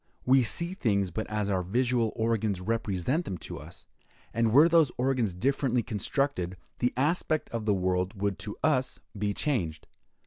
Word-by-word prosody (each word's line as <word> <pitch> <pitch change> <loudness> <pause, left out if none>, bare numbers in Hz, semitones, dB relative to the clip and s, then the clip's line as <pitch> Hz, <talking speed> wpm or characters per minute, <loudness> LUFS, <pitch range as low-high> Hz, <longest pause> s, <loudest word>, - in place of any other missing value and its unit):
We 130 +1 +6
see 170 +9 -1
things 100 - 0
but 110 +6 -4
as 105 -1 -1
our 95 -2 +1
visual 120 +4 +1
organs 110 -4 0
represent 110 - -1
them 90 - -4
to - - -6
us; - - -13 0.5
and 115 -1 +2
were 145 +7 +7
those 165 -5 +4
organs 125 -7 +1
differently 125 +3 +1
constructed, 105 -4 -1 0.2
the 125 - +2
aspect 155 +2 0
of 115 -2 -3
the 105 - +4
world 95 +1 -1
would 100 -1 -1
to 105 - -6
us 130 -4 +1 0.2
be 105 0 -1
changed. 85 - -1
115 Hz, 165 wpm, -29 LUFS, 100-130 Hz, 0.5 s, were